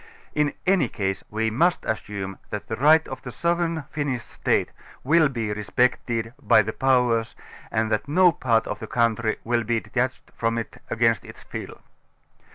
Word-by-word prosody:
In 150 Hz, -1 st, +1 dB
any 185 Hz, -7 st, +3 dB
case, 95 Hz, -1 st, -2 dB
we 110 Hz, +1 st, -1 dB
must 170 Hz, +10 st, +2 dB
as>sume. 100 Hz, -3 st, -4 dB
that 105 Hz, -1 st, -5 dB
the 110 Hz, -, -2 dB
right 155 Hz, +6 st, +5 dB
of 130 Hz, -, -7 dB
the 125 Hz, -, -7 dB
sovereign 170 Hz, +1 st, 0 dB
Finnish 140 Hz, -5 st, -2 dB
iState -, -, 0 dB, 0.3 s
will 155 Hz, +2 st, +4 dB
be 115 Hz, -5 st, -2 dB
respected 115 Hz, +1 st, 0 dB
by 110 Hz, -5 st, +5 dB
the 110 Hz, +2 st, -4 dB
Powers 125 Hz, -3 st, +2 dB, 0.3 s
and 110 Hz, 0 st, 0 dB
that 110 Hz, +5 st, 0 dB
no 180 Hz, +4 st, +5 dB
part 115 Hz, -6 st, +1 dB
of -, -, -4 dB
the -, -, -7 dB
country 115 Hz, -2 st, +1 dB
will 120 Hz, 0 st, +1 dB
be 115 Hz, +1 st, 0 dB
detached 125 Hz, +2 st, -3 dB
from 115 Hz, 0 st, 0 dB
it 115 Hz, -, -6 dB
against 115 Hz, -1 st, +2 dB
its -, -, -13 dB
will. -, -, -6 dB
120 Hz, 165 wpm, -24 LUFS, 110-145 Hz, 0.3 s, right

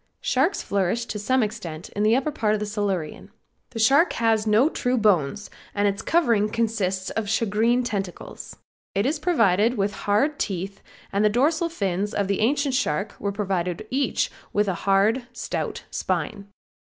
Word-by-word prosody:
Sharks 310 Hz, +10 st, +1 dB
flourished 200 Hz, +4 st, -1 dB
to 210 Hz, -, -4 dB
some 255 Hz, +4 st, +2 dB
extent 185 Hz, -7 st, -5 dB
in 205 Hz, -, -4 dB
the 215 Hz, +2 st, +4 dB
upper 275 Hz, +4 st, 0 dB
part 215 Hz, -7 st, +1 dB
of -, -, -2 dB
the 210 Hz, -, -2 dB
Silurian. 200 Hz, -7 st, -3 dB, 0.4 s
The 235 Hz, -, -9 dB
shark 275 Hz, +10 st, +4 dB
has 225 Hz, -2 st, +1 dB
no 215 Hz, +6 st, +5 dB
true 250 Hz, -5 st, -1 dB
bones 205 Hz, -, +1 dB, 0.2 s
and 205 Hz, 0 st, +2 dB
its 200 Hz, 0 st, -1 dB
covering 235 Hz, -11 st, +2 dB
consists 210 Hz, -5 st, -1 dB
of 220 Hz, -2 st, -3 dB
shagreen 225 Hz, +3 st, +2 dB
tentacles. 195 Hz, -6 st, -5 dB, 0.4 s
It 200 Hz, -, +1 dB
is 295 Hz, +3 st, 0 dB
provided 230 Hz, -, +2 dB
with 200 Hz, 0 st, 0 dB
hard 215 Hz, +10 st, 0 dB
teeth 195 Hz, 0 st, -3 dB, 0.3 s
and 200 Hz, +1 st, +2 dB
the 210 Hz, -, +5 dB
dorsal 315 Hz, +9 st, +2 dB
fins 200 Hz, -, -2 dB
of 200 Hz, -1 st, 0 dB
the 200 Hz, -1 st, 0 dB
ancient 280 Hz, +4 st, +1 dB
shark 200 Hz, -5 st, 0 dB
were 200 Hz, -, -1 dB
provided 190 Hz, -2 st, -2 dB
each 270 Hz, +2 st, 0 dB, 0.2 s
with 205 Hz, 0 st, +1 dB
a 190 Hz, -, +1 dB, 0.2 s
hard, 215 Hz, +6 st, +3 dB
stout -, -, -4 dB
spine. 200 Hz, -2 st, -2 dB
210 Hz, 165 wpm, -24 LUFS, 200-245 Hz, 0.4 s, no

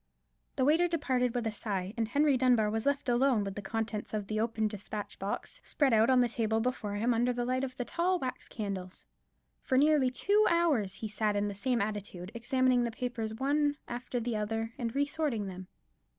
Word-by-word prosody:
The 260 Hz, -, +2 dB
waiter 325 Hz, +5 st, +4 dB
departed 260 Hz, -7 st, 0 dB
with 240 Hz, -2 st, -1 dB
a 225 Hz, -, 0 dB
sigh; 200 Hz, -2 st, -3 dB
and 230 Hz, -2 st, 0 dB
Henry 285 Hz, +4 st, +3 dB
Dunbar 245 Hz, -4 st, +3 dB
was 225 Hz, +4 st, -1 dB
left 280 Hz, 0 st, 0 dB
alone 245 Hz, -2 st, +3 dB
with 195 Hz, -1 st, -4 dB
the 205 Hz, -, -6 dB
contents 215 Hz, +1 st, -3 dB
of 210 Hz, -1 st, -2 dB
the 215 Hz, +2 st, -2 dB
open 220 Hz, -1 st, 0 dB
despatch 210 Hz, 0 st, -6 dB
box 205 Hz, -, -4 dB
spread 275 Hz, -5 st, +2 dB
out 220 Hz, +2 st, +5 dB
on 255 Hz, -1 st, +5 dB
the 245 Hz, -, +3 dB
table 225 Hz, -1 st, 0 dB
before 225 Hz, -4 st, -2 dB
him 230 Hz, +4 st, +1 dB
under 240 Hz, +2 st, +2 dB
the 245 Hz, 0 st, -2 dB
light 255 Hz, +1 st, 0 dB
of 255 Hz, -1 st, -4 dB
the 245 Hz, -, -2 dB
tall 360 Hz, +6 st, +1 dB
wax 255 Hz, -6 st, -5 dB
candles. 195 Hz, -4 st, -5 dB, 0.6 s
For 260 Hz, -, +1 dB
nearly 290 Hz, -2 st, +4 dB
two 410 Hz, +11 st, +3 dB
hours 290 Hz, -, +2 dB
he 220 Hz, -, -5 dB
sat 210 Hz, 0 st, 0 dB
in 205 Hz, 0 st, +1 dB
the -, -, -4 dB
same 235 Hz, +4 st, 0 dB
attitude, 200 Hz, -3 st, -5 dB
examining 250 Hz, +1 st, +2 dB
the 235 Hz, -, 0 dB
papers 230 Hz, -2 st, -4 dB
one 290 Hz, +3 st, +1 dB
after 245 Hz, +1 st, -3 dB
the 235 Hz, -1 st, -2 dB
other, 225 Hz, +2 st, -2 dB
and 235 Hz, -2 st, -4 dB
re 285 Hz, +1 st, +3 dB
sorting 285 Hz, -8 st, -2 dB
them. 185 Hz, -1 st, -7 dB
235 Hz, 210 wpm, -31 LUFS, 215-260 Hz, 0.6 s, out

